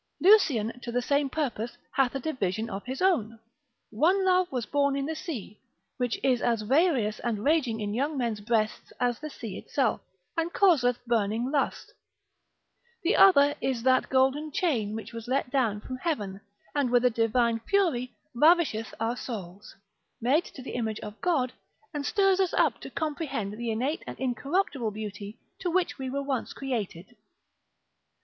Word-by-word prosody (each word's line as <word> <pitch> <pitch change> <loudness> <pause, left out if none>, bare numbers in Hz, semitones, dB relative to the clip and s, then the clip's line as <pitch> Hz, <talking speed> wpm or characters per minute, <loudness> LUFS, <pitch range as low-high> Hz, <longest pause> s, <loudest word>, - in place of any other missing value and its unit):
Lucian, 285 - +5
to 240 - -5
the 245 - +1
same 280 +2 +1
purpose, 255 -6 -3
hath 265 -1 +1
a - - 0
division 225 - -2
of 195 +1 -5
his 265 +7 -3
own, 230 - +2 0.5
One 360 - +3
love 370 -1 +3
was 250 -4 -2
born 280 -1 +1
in 275 0 -1
the 320 - -2
sea, 255 - -6 0.4
which 245 -2 -1
is 255 -3 +2
as 230 -3 +1
various 255 - +2
and 220 -4 -2
raging 275 -7 +2
in 205 -1 -3
young 285 +6 -1
men's 230 -5 -1
breasts 215 0 -1
as 245 -1 0
the 305 - -6
sea 225 -8 -7
itself, 260 -6 0 0.3
and 330 +1 -1
causeth 250 -12 +3
burning 230 +2 0
lust: 285 -2 -1 1.1
the 370 +7 +2
other 290 -7 +7
is 255 -4 -1
that 260 0 +3
golden 270 +4 +2
chain 240 - 0
which 225 - -7
was 230 0 -7
let 260 0 0
down 230 -7 +1
from 255 +3 -6
heaven, 205 - -3 0.3
and 285 -4 +1
with 245 0 +3
a 250 - +5
divine 230 +1 +2
fury 265 - +1 0.2
ravisheth 300 -5 +3
our 225 +2 0
souls, 205 -6 -7 0.4
made 275 +9 +2
to 260 - -10
the - - -7
image 225 -3 -2
of 210 +1 -9
God, 275 -8 +1 0.4
and 290 -1 -3
stirs 390 -2 +3
us 375 -2 +1
up - - +2
to - - -7
comprehend 285 -10 -3
the 235 +2 -4
innate 255 +8 -1
and - - -7
incorruptible 270 - -1
beauty 210 0 -7 0.2
to 360 - -2
which 350 -3 0
we 265 -1 -3
were 280 +2 -2
once 270 -3 -2
created. 230 -6 -4
255 Hz, 170 wpm, -28 LUFS, 225-295 Hz, 1.1 s, other